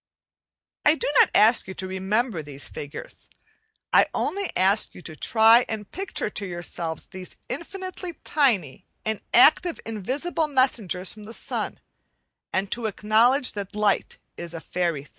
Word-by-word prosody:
* - - -70
I 295 - +6
do - - -3
not - - +7
ask 220 +1 +5
you 190 - -7
to 190 - -5
remember 190 +1 -1
these 145 -1 -7
figures; 145 -1 -9 0.6
I - - +6
only 395 -1 -1
ask 195 +4 +2
you 180 - -11
to 155 - -8
try 225 - +5
and 210 -3 -5
picture 380 - -3
to 205 - -4
yourselves 175 -2 -4
these 185 -1 -9
infinitely 365 +5 -5
tiny 220 - +1 0.2
and 220 -1 -2
active 350 -3 +5
invisible 265 - -2
messengers 230 - 0
from 215 -1 -12
the 225 +2 -9
sun, - - -4 0.7
and 195 +1 -1
to 235 -2 -1
acknowledge 225 +6 +3
that 200 -1 -6
light 210 -2 +1 0.2
is 170 0 -7
a - - -4
fairy 170 -4 -2
thing. 145 - -20
210 Hz, 155 wpm, -25 LUFS, 185-255 Hz, 0.7 s, not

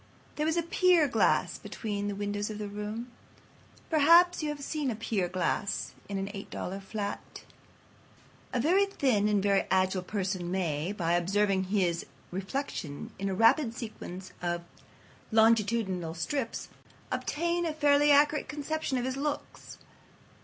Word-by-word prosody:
There 300 +1 0
was 320 +1 +1
a 340 - +2
pier 345 -2 +4
glass 230 -4 +2
between 205 -2 -4
the 205 - -2
windows 205 +1 -2
of 215 - -5
the 210 -1 -4
room. 210 +4 -5 0.8
Perhaps 335 +4 +6
you 305 - -1
have 290 -1 -5
seen 295 -2 -2
a 235 - -2
pier 210 -4 -1
glass 185 +3 -1 0.2
in 200 - -2
an 195 - -2
$8 195 -1 -6
flat. 200 +1 -5 1.1
A 250 - 0
very 370 +10 +3
thin 250 - +1
and 205 -2 +2
very 200 -1 +2
agile 185 0 +2
person 185 -2 -3
may, 170 -2 -1
by 170 -5 -1
observing 190 +2 +2
his 185 -4 0 0.2
reflection 190 - -4
in 195 0 -1
a 190 - -1
rapid 230 - +4
sequence 190 -5 -7
of 175 -1 -2 0.7
longitudinal 220 -6 +2
strips, 230 +8 -3 0.4
obtain 340 +2 -1
a - - 0
fairly 295 -1 +4
accurate 290 +1 +4
conception 300 -2 -2
of 245 - -1
his 260 +1 -2
looks. 290 +1 -4
210 Hz, 145 wpm, -29 LUFS, 190-285 Hz, 1.1 s, Perhaps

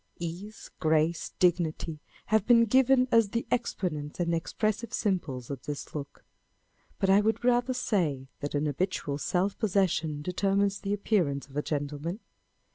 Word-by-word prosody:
Ease, 175 +6 -7
grace, 160 +1 +1
dignity 170 -3 +1 0.3
have 215 -1 +2
been 235 -1 +6
given 255 +2 +4
as 230 -3 +5
the 230 +3 -2
exponents 170 -12 -2
and 170 -1 +1
expressive 215 +6 -1
symbols 145 - -2
of 135 -3 -5
this 145 -1 -5
look; 145 -2 -7 0.7
but 195 - +1
I 195 +2 +6
would 220 +3 0
rather 245 +1 +2
say, 165 - 0
that 145 +1 -4
an 145 +1 +1
habitual 150 -2 -1
self 190 +6 0
possession 175 -8 +1
determines 195 +3 +1
the 200 0 -2
appearance 175 -10 0
of 135 - -15
a 150 - +1
gentleman. 150 +5 -3
180 Hz, 145 wpm, -29 LUFS, 150-215 Hz, 0.7 s, been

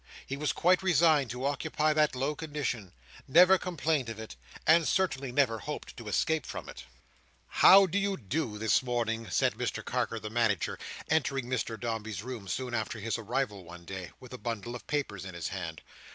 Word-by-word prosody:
He 135 - -4
was 150 +1 0
quite 180 +1 +3
resigned 160 -7 +4
to 125 +2 -4
occupy 150 +2 +1
that 150 -3 +2
low 135 +4 0
condition: 145 - -4 0.4
never 180 +6 +7
complained 155 -7 -1
of 110 -1 -6
it: 110 -7 -8 0.3
and 160 0 +5
certainly 140 -9 0
never 120 -4 +2
hoped 150 +5 -6
to 115 - -9
escape 150 +8 0
from - - -6
it. - - -10 0.6
"How 195 +1 +8
do 185 +2 0
you 200 -1 0
do 120 -1 -3
this 110 +1 +3
morning?" 115 -3 -2
said - - +2
Mr - - -3
Carker 115 - -1
the 105 -1 -7
Manager, 110 -5 0 0.3
entering 140 -5 +1
Mr 120 -3 -2
Dombey's 110 -3 -4
room 120 -5 -7
soon 125 +4 -3
after 110 -1 -2
his 115 +2 -2
arrival 110 -3 -2
one 85 0 -12
day: 95 -2 -6
with 125 -1 -12
a 125 - -7
bundle 120 0 -4
of 125 - -9
papers 135 -11 -2
in 95 -2 -8
his 85 - -3
hand. - - -6
125 Hz, 185 wpm, -30 LUFS, 110-150 Hz, 0.6 s, How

